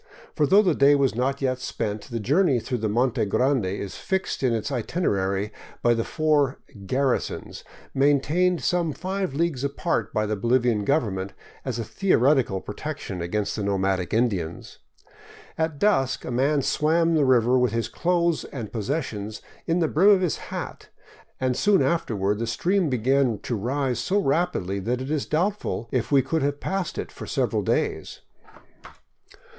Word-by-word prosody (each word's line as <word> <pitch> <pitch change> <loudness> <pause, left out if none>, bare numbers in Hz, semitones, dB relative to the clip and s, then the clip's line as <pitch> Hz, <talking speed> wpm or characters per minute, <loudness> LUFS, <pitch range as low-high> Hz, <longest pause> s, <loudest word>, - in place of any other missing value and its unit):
For 150 - +2
though 200 +5 +6
the 180 -5 +3
day 140 0 +5
was 140 -2 +2
not 135 +4 -1
yet 130 -1 0
spent, 105 -4 -3
the 115 -2 -3
journey 140 - +2
through 125 +1 -3
the 110 0 -1
Monte 120 +3 +1
Grande 125 +1 +1
is 95 0 -5
fixed 190 -2 -2
in 130 -2 +2
its 115 +5 -2
itinerary 105 - -1 0.3
by 120 - +5
the 115 0 0
four 150 -2 +1
" 100 -3 -13
garrisons 130 +3 -1 0.2
" - - -24
maintained 160 +6 +2
some 170 -3 +1
five 185 -2 -3
leagues 155 -4 0
apart 140 0 -1
by 110 - 0
the 105 0 -1
Bolivian 120 -1 +1
government 100 -9 0 0.3
as 130 -3 -3
a 115 - -2
theoretical 130 - +2
protection 90 -2 -6
against 100 +4 -2
the 110 - -3
nomadic 95 -2 0
Indians. 100 -8 -1 0.8
At 160 -2 -1
dusk 140 -9 +1
a - - -4
man 140 +3 +1
swam 165 +4 +2
the 155 -2 +3
river 125 -1 +4
with 125 -3 +2
his 115 -1 -1
clothing 170 +6 0
and 115 -7 -6
pos 110 -3 -4
sessions 110 -8 -3 0.3
in 170 +1 +1
the 160 - +3
brim 180 +7 +4
of 200 -2 +5
his 180 -4 0
hat, - - -6 0.5
and 130 -1 0
soon 205 +5 +3
afterward 105 - 0
the 115 - -2
stream 180 - +1
began 130 -1 +2
to 120 - -2
rise 125 +3 -1
so 185 - 0
rapidly 135 - 0
that 120 +6 -1
it 130 +3 -5
Is 155 -3 -1
doubtful 175 - -1
if 125 -1 -1
we 140 -2 +5
could 160 +4 -1
have 145 +1 -1
passed 190 -2 -3
it - - -4
for - - -9
several - - 0
days. - - -2
130 Hz, 170 wpm, -25 LUFS, 110-155 Hz, 0.8 s, though